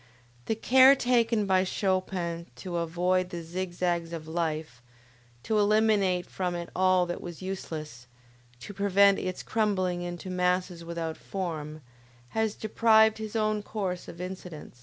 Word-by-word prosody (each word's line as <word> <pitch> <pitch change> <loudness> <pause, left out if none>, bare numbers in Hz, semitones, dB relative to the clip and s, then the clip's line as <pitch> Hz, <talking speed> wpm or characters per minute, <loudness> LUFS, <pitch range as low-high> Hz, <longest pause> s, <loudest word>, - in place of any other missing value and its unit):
The 225 - +1
care 260 +4 +6
taken 235 -4 +2
by 190 -1 +3
Chopin 185 -3 -2
to 180 -3 -5
avoid 180 +2 0
the 170 -2 -6
zig 175 +2 -4
zags 175 -2 -1
of 160 -2 -6
life, 160 -6 -3 0.6
to 215 -1 +1
eliminate 205 -4 +3
from 180 -2 -3
it 170 0 -6
all 185 -1 +3
that 175 0 -5
was 175 +1 -8
useless, 155 -9 -6 0.5
to 205 - -8
prevent 200 0 +4
its 185 -1 -4
crumbling 185 -5 0
into 175 +1 -6
masses 180 -1 0
without 165 -1 -4
form, 155 -5 -5 0.5
has 220 +3 -1
deprived 220 0 +4
his 220 0 -6
own 215 -1 +1
course 195 -4 -4
of 170 - -10
incident. 180 -3 -7
185 Hz, 140 wpm, -28 LUFS, 170-205 Hz, 0.6 s, care